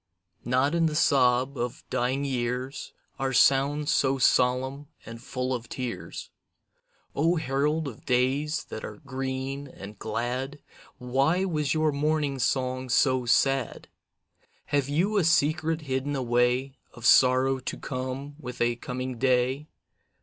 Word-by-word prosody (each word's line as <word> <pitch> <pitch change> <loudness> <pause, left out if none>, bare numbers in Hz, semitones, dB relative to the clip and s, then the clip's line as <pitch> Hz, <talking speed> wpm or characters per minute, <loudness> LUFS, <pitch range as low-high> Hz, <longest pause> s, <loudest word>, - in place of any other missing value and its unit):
Not 130 +5 +2
in 165 -1 +3
the 155 - -3
sob 130 -2 +3
of 120 0 -4
dying 130 +3 0
years 125 +1 -3 0.3
Are 135 0 -1
sounds 140 +4 +3
so 135 0 +2
solemn 130 +3 +2 0.2
and 115 +1 -9
full 130 +1 -3
of 120 -2 -5
tears. 125 -2 -6 0.8
O 165 +5 +2
herald 150 +1 0
of 120 -5 -9
days 135 +5 +1
that 110 - -6
are - - -6
green 135 0 -4
and 105 -5 -11
glad, 125 +6 -3 0.4
Why 135 +9 +1
was 155 -5 -1
your 155 -1 +2
morning 145 -1 0
song 130 0 -1
so 130 0 +2
sad? 135 +1 +1 0.8
Have 140 -1 0
you 185 +9 +1
a 195 - +3
secret 160 0 +2
hidden 140 0 -2
away, 125 +1 0 0.2
Of 120 -1 -9
sorrow 130 +1 +5
to 130 - -5
come 130 +2 -5
with 125 -5 -8
a 120 0 +1
coming 125 0 -5
day? 130 +3 +1
135 Hz, 135 wpm, -27 LUFS, 125-145 Hz, 0.8 s, sorrow